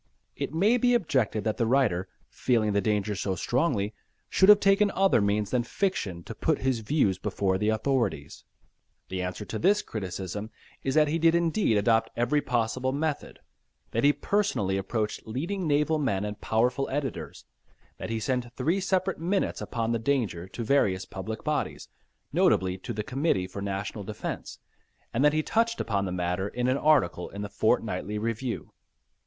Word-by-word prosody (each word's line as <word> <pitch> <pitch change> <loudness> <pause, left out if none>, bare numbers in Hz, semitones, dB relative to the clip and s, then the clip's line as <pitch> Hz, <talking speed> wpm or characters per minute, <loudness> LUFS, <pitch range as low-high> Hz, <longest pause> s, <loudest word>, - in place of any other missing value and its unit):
It - - -3
may 200 +10 +3
be 245 0 +3
objected 135 - +1
that 110 -1 -1
the 115 - +1
writer, 115 -8 +2 0.2
feeling 110 -5 +1
the 100 - +2
danger 105 -1 0
so 95 -1 -2
strongly, 115 - 0 0.4
should 190 - +4
have 210 -1 +9
taken 200 +1 +4
other 195 - +4
means 100 0 0
than 125 - +2
fiction 115 - -2
to 115 - -7
put 155 +5 0
his 130 -3 +2
views 105 -6 +1
before 95 -1 0
the 105 - +1
authorities. 110 - -1 0.7
The 95 -1 -3
answer 90 +3 -4
to 110 +3 -4
this 205 +4 +3
criticism 100 0 -5 0.3
is 135 - -2
that 155 -1 +5
he 160 +3 0
did 165 +1 +4
indeed 170 - +2
adopt 115 +2 +2
every 140 +5 +2
possible 125 0 0
method, 150 +1 -3 0.5
that 115 - 0
he 145 - +7
personally 190 - 0
approached 105 +3 -2
leading 170 - -3
naval 150 +2 +2
men 105 -9 0
and 105 0 -6
powerful 125 +5 +1
editors, 140 0 -4 0.5
that - - -5
he 115 0 -1
sent 125 +1 -2
three 165 +9 +1
separate 190 -1 0
minutes 185 +4 -1
upon 115 -1 -2
the 115 - 0
danger 110 -9 -1
to 115 +5 -6
various 100 -8 +2
public 105 +5 -6
bodies, 150 -2 -2 0.4
notably 95 -1 +3
to 105 - -6
the 105 -2 -3
Committee 130 - 0
for 95 +2 -7
National 100 +1 -4
Defence, 105 +2 -6 0.6
and 120 - +1
that 150 0 +5
he 155 0 +1
touched 230 +4 +1
upon 100 -3 0
the 90 - -3
matter 90 +1 -1
in 125 +4 -2
an 130 +1 +2
article 140 - +2
in 100 +1 -6
The 105 - -5
Fortnightly 105 +1 0
Review. 115 +3 -3
115 Hz, 170 wpm, -27 LUFS, 100-150 Hz, 0.7 s, have